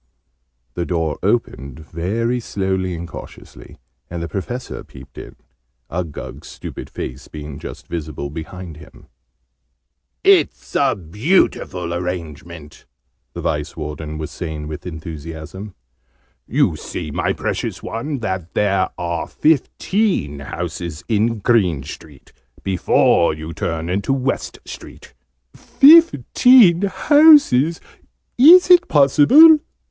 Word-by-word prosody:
The 85 Hz, -, -3 dB
door 80 Hz, -4 st, -2 dB
opened, 70 Hz, +2 st, -2 dB
very 105 Hz, +10 st, -3 dB
slowly 95 Hz, -4 st, -3 dB
and 85 Hz, +1 st, -7 dB
cautiously, -, -, -12 dB, 0.3 s
and 85 Hz, -, -6 dB
the -, -, -4 dB
Professor 120 Hz, +9 st, -6 dB
peeped 65 Hz, 0 st, -14 dB
in, -, -, -11 dB, 0.6 s
Uggug's 85 Hz, -3 st, -6 dB
stupid -, -, -9 dB
face 65 Hz, +2 st, -7 dB
being 75 Hz, -2 st, -9 dB
just -, -, -9 dB
visible 75 Hz, -4 st, -6 dB
behind 85 Hz, +1 st, -8 dB
him. -, -, -16 dB, 1.2 s
"It 390 Hz, -2 st, +4 dB
is -, -, -18 dB
a 135 Hz, -3 st, +2 dB
beautiful 95 Hz, -, -1 dB
arrangement!" 85 Hz, -4 st, -7 dB, 0.5 s
the -, -, -6 dB
Vice 75 Hz, +3 st, -3 dB
warden 75 Hz, 0 st, -6 dB
was 75 Hz, -1 st, -6 dB
saying 80 Hz, -3 st, -6 dB
with 75 Hz, +3 st, -8 dB
enthusiasm. 80 Hz, +4 st, -8 dB, 0.7 s
"You -, -, +1 dB
see, 80 Hz, -4 st, -7 dB
my -, -, -1 dB
precious -, -, -4 dB
one, 130 Hz, +4 st, -5 dB
that 95 Hz, -5 st, -5 dB
there 100 Hz, -2 st, +1 dB
are 85 Hz, -1 st, -3 dB
fifteen 160 Hz, -, 0 dB
houses 85 Hz, 0 st, -6 dB
in 115 Hz, +1 st, +1 dB
Green 95 Hz, -, +1 dB
Street, 70 Hz, -1 st, -12 dB, 0.3 s
before 90 Hz, -3 st, +2 dB
you 80 Hz, +1 st, -8 dB
turn 80 Hz, +1 st, -4 dB
into 100 Hz, +8 st, -1 dB
West 135 Hz, 0 st, -3 dB
Street." -, -, -12 dB, 0.4 s
"Fifteen 250 Hz, -, +5 dB
houses! 285 Hz, -, +5 dB, 0.6 s
Is 355 Hz, +7 st, +8 dB
it 355 Hz, 0 st, +6 dB
possible?" 205 Hz, -, +6 dB
90 Hz, 110 wpm, -19 LUFS, 80-125 Hz, 1.2 s, Is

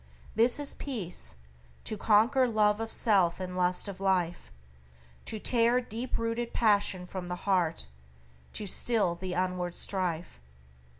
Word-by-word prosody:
"This 235 Hz, +5 st, +3 dB
is 290 Hz, -1 st, -1 dB
peace, 215 Hz, -11 st, -5 dB, 0.5 s
To 215 Hz, -, -3 dB
conquer 225 Hz, +6 st, +4 dB
love 210 Hz, -2 st, +2 dB
of 225 Hz, 0 st, -4 dB
self 190 Hz, -7 st, +2 dB
and 180 Hz, -1 st, -5 dB
lust 180 Hz, +2 st, 0 dB
of 195 Hz, -2 st, -7 dB
life, 180 Hz, -, 0 dB, 0.7 s
To 220 Hz, -, -4 dB
tear 235 Hz, +2 st, +3 dB
deep 240 Hz, +1 st, -4 dB
rooted 230 Hz, +1 st, -3 dB
passion 205 Hz, -4 st, +2 dB
from 180 Hz, 0 st, -6 dB
the 180 Hz, -, -3 dB
heart 180 Hz, -5 st, +1 dB, 0.7 s
To 210 Hz, -, -4 dB
still 205 Hz, -2 st, +2 dB
the 180 Hz, +1 st, -5 dB
inward 180 Hz, -1 st, -1 dB
strife." 175 Hz, -, -3 dB
200 Hz, 135 wpm, -29 LUFS, 180-230 Hz, 0.7 s, conquer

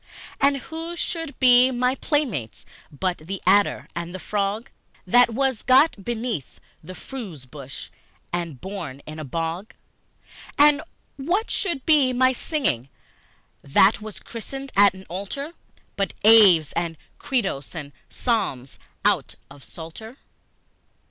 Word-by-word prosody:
And 280 Hz, 0 st, +3 dB
who 325 Hz, +5 st, -6 dB
should 325 Hz, -3 st, -4 dB
be 250 Hz, 0 st, +6 dB
my 250 Hz, 0 st, +1 dB
playmates 265 Hz, -, -2 dB, 0.3 s
but 180 Hz, +5 st, -2 dB
the 185 Hz, +5 st, -6 dB
adder 200 Hz, +2 st, +3 dB
and 170 Hz, +1 st, -5 dB
the -, -, -6 dB
frog, 205 Hz, +4 st, -2 dB, 0.3 s
That 245 Hz, +6 st, +5 dB
was 260 Hz, -1 st, 0 dB
got 260 Hz, -4 st, +4 dB
beneath 230 Hz, -, -4 dB, 0.2 s
a 185 Hz, +4 st, -9 dB
furze 195 Hz, -, -8 dB
bush 135 Hz, 0 st, -9 dB, 0.4 s
and 170 Hz, -6 st, -3 dB
born 170 Hz, -8 st, -7 dB
in 155 Hz, +1 st, -8 dB
a -, -, -5 dB
bog? 165 Hz, -, -4 dB, 0.8 s
And 295 Hz, 0 st, +6 dB, 0.4 s
what 350 Hz, -, -1 dB
should 340 Hz, -, -1 dB
be 285 Hz, -5 st, +4 dB
my 255 Hz, +1 st, +4 dB
singing, 245 Hz, -, -1 dB, 0.7 s
that 190 Hz, +9 st, +4 dB
was 215 Hz, -1 st, -8 dB
christened 270 Hz, +4 st, -7 dB
at 200 Hz, -1 st, +6 dB
an 190 Hz, 0 st, -12 dB
altar, 200 Hz, -, -5 dB, 0.4 s
But 195 Hz, -1 st, -2 dB
Aves 200 Hz, -8 st, +7 dB
and 170 Hz, -1 st, -3 dB, 0.2 s
Credos 195 Hz, -, -2 dB
and 145 Hz, -3 st, -6 dB, 0.2 s
Psalms 140 Hz, -, -2 dB, 0.3 s
out -, -, +2 dB, 0.2 s
of 140 Hz, -, -13 dB
Psalter? 220 Hz, +10 st, -10 dB
210 Hz, 130 wpm, -24 LUFS, 170-265 Hz, 0.8 s, Aves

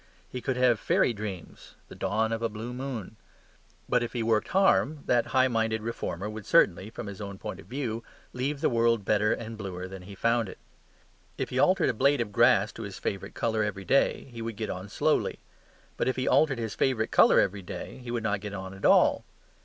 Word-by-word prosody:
He 125 Hz, -, -6 dB
could 130 Hz, 0 st, -2 dB
have 125 Hz, -3 st, +3 dB
fairy 120 Hz, -, +2 dB
dreams; 100 Hz, -4 st, -8 dB
the -, -, -11 dB
dawn 110 Hz, +4 st, 0 dB
of 115 Hz, 0 st, -2 dB
a 115 Hz, -, 0 dB
blue 110 Hz, +3 st, -6 dB
moon. 125 Hz, -5 st, -6 dB, 0.7 s
But 125 Hz, -, +2 dB
if 120 Hz, -, -3 dB
he 120 Hz, -2 st, -1 dB
worked 110 Hz, -1 st, +1 dB
hard, 155 Hz, -6 st, +2 dB
that 120 Hz, -1 st, +2 dB
high 130 Hz, -1 st, +3 dB
minded 110 Hz, -2 st, 0 dB
reformer 105 Hz, -4 st, -4 dB
would 105 Hz, -1 st, -7 dB
certainly 95 Hz, +3 st, +3 dB
(from 110 Hz, -, -7 dB
his 100 Hz, -1 st, -7 dB
own 100 Hz, -1 st, -6 dB
point 95 Hz, -, -6 dB
of -, -, -13 dB
view) 120 Hz, -4 st, -3 dB, 0.3 s
leave 140 Hz, +3 st, -2 dB
the -, -, +3 dB
world 115 Hz, -3 st, +2 dB
better 105 Hz, +1 st, +2 dB
and 115 Hz, -1 st, -4 dB
bluer 95 Hz, -3 st, -5 dB
than 95 Hz, 0 st, -9 dB
he 100 Hz, +2 st, -10 dB
found 115 Hz, 0 st, +1 dB
it. -, -, -10 dB, 0.8 s
If -, -, -3 dB
he 130 Hz, -, 0 dB
altered 185 Hz, +7 st, +4 dB
a -, -, +1 dB
blade 140 Hz, +5 st, +3 dB
of 115 Hz, -3 st, -2 dB
grass 105 Hz, -2 st, +4 dB
to -, -, -9 dB
his 100 Hz, -3 st, -6 dB
favourite 100 Hz, +1 st, -4 dB
colour 110 Hz, -1 st, 0 dB
every 100 Hz, -2 st, -4 dB
day, 140 Hz, -, +2 dB
he 115 Hz, -1 st, -8 dB
would 115 Hz, -1 st, -4 dB
get 110 Hz, +1 st, -3 dB
on 95 Hz, +2 st, -7 dB
slowly. -, -, +1 dB, 0.6 s
But -, -, 0 dB
if 130 Hz, -, +1 dB
he 130 Hz, -, -2 dB
altered 145 Hz, -5 st, +3 dB
his 115 Hz, -2 st, -3 dB
favourite 120 Hz, -5 st, 0 dB
colour -, -, +6 dB
every 100 Hz, 0 st, +1 dB
day, 95 Hz, +7 st, -7 dB
he 125 Hz, -1 st, -9 dB
would 120 Hz, -2 st, -2 dB
not 100 Hz, -2 st, 0 dB
get 100 Hz, -1 st, -6 dB
on 95 Hz, 0 st, -6 dB
at 95 Hz, -, -6 dB
all. -, -, +5 dB
110 Hz, 220 wpm, -28 LUFS, 100-125 Hz, 0.8 s, colour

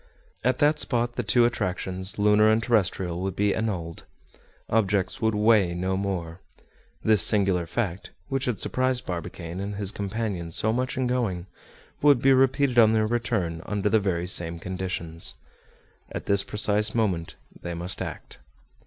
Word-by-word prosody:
At 125 Hz, +1 st, +2 dB
that 150 Hz, +1 st, +3 dB
spot 120 Hz, -1 st, 0 dB
the 120 Hz, -, -2 dB
two 120 Hz, +2 st, +3 dB
attractions, 95 Hz, -4 st, -2 dB
lunar 105 Hz, +1 st, +4 dB
and 110 Hz, +1 st, +2 dB
terrestrial, 95 Hz, -6 st, 0 dB
would 95 Hz, -1 st, -3 dB
be 105 Hz, 0 st, +2 dB
annulled. 90 Hz, -7 st, -3 dB, 0.7 s
Objects 100 Hz, -3 st, 0 dB
would 110 Hz, -1 st, +1 dB
"weigh" 105 Hz, -5 st, +3 dB
no 95 Hz, +2 st, -1 dB
more. 95 Hz, -3 st, -3 dB, 0.6 s
This 110 Hz, -4 st, +5 dB
singular 95 Hz, -5 st, +3 dB
fact, 95 Hz, -1 st, -3 dB, 0.2 s
which 135 Hz, -1 st, -1 dB
had 120 Hz, -7 st, -2 dB
surprised 130 Hz, 0 st, 0 dB
Barbicane 85 Hz, 0 st, -6 dB
and 100 Hz, +1 st, -4 dB
his 100 Hz, -1 st, -2 dB
companions 100 Hz, -5 st, -3 dB
so 110 Hz, 0 st, +2 dB
much 130 Hz, +2 st, -2 dB
in 130 Hz, -, 0 dB
going, 115 Hz, -9 st, -1 dB, 0.6 s
would 145 Hz, -3 st, +5 dB
be 135 Hz, +2 st, +5 dB
repeated 135 Hz, -1 st, +3 dB
on 110 Hz, -1 st, +6 dB
their 110 Hz, -1 st, +2 dB
return 105 Hz, -8 st, -1 dB
under 105 Hz, 0 st, 0 dB
the 110 Hz, -, +4 dB
very 90 Hz, -4 st, -1 dB
same 85 Hz, -2 st, -2 dB
conditions. 90 Hz, -2 st, -4 dB, 0.8 s
At -, -, -6 dB
this 100 Hz, -1 st, +2 dB
precise 105 Hz, +1 st, 0 dB
moment 95 Hz, -8 st, -1 dB, 0.3 s
they 85 Hz, -1 st, -5 dB
must 90 Hz, +2 st, -2 dB
act. -, -, -7 dB
105 Hz, 155 wpm, -25 LUFS, 90-115 Hz, 0.8 s, on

